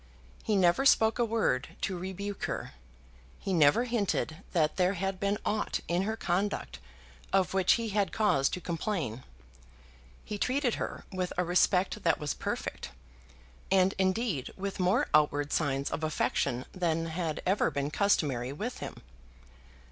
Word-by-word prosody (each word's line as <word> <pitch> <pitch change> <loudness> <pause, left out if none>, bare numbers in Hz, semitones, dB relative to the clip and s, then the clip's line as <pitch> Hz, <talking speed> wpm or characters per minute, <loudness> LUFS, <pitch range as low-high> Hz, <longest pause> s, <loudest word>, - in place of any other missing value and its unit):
He 215 - +1
never 180 +5 +4
spoke 225 -4 +4
a - - +4
word 215 - 0
to 190 - -1
rebuke 190 +3 -4
her. - - -4 0.7
He 195 - -3
never 155 +6 +5
hinted 210 -9 -1
that 155 -3 +1
there 185 +1 +2
had 190 +1 -2
been 200 +1 0
aught 210 0 -1
in 175 +1 +1
her 220 - -2
conduct 175 - -1 0.5
of 190 -2 +2
which 190 -1 +4
he 230 -1 -1
had 200 -1 +1
cause 140 -11 +2
to - - -4
complain. 165 - -3 1.0
He 210 - -5
treated 255 0 +1
her - - -5
with 185 -2 -2
a 180 - +2
respect 180 +3 +2
that 165 -4 +2
was 150 -1 -2
perfect, - - -4 0.8
and 190 0 +4
indeed 190 - 0
with 195 0 -4
more 185 +6 +2
outward 145 -1 +3
signs 140 -3 0
of 160 - -3
affection 140 -4 0
than 165 -3 0
had 160 -1 -3
ever 190 +3 +2
been 140 +1 -2
customary 145 - +1
with 215 - -5
him. - - -8
185 Hz, 150 wpm, -30 LUFS, 155-205 Hz, 1.0 s, never